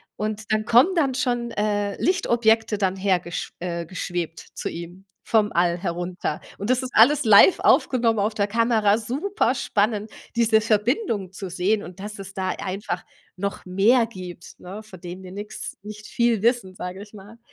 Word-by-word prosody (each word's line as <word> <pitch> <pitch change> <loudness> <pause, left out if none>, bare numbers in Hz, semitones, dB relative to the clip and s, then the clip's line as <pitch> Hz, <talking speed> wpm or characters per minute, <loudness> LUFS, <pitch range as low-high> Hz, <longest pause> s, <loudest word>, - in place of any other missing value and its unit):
und 215 +1 -4
dann 215 0 0
kommen 250 +12 +5
dann 275 -6 +1
schon, 240 -2 -1
äh, 205 -2 -1
Lichtobjekte 230 - +2
dann 190 -1 0
hergesch 185 -3 -1
äh, 170 -1 -3
geschwebt 175 -3 -4
zu - - -4
ihm 175 +3 -9 0.2
vom 215 -2 +2
All 175 0 +2
herunter 175 -3 -3 0.2
und 205 +4 -4
das 255 +1 +2
ist 255 - -5
alles 265 +5 +6
live 215 - +7
aufgenommen 230 -4 +3
auf 210 +2 0
der 200 - +1
Kamera. 225 -1 +2
Superspannend 230 - -1 0.2
diese 225 -2 +4
Verbindung 215 - 0
zu 190 -1 -7
sehen 190 +4 0
und 180 0 -11
dass 210 0 -7
es 195 0 -8
da 190 -1 -2
einfach 185 -2 -4 0.3
noch 200 +1 -4
mehr 210 +7 +4
gibt, 180 -6 -10
ne? 200 +4 -9
Von 190 -5 -14
dem 180 +1 -8
wir 180 - -10
nix 205 +2 -7
nicht 215 +1 -10
viel 235 -3 +1
wissen, 235 -6 +1
sage 180 +2 -6
ich 205 +1 -12
mal. 210 +3 -13
210 Hz, 170 wpm, -23 LUFS, 185-230 Hz, 0.3 s, live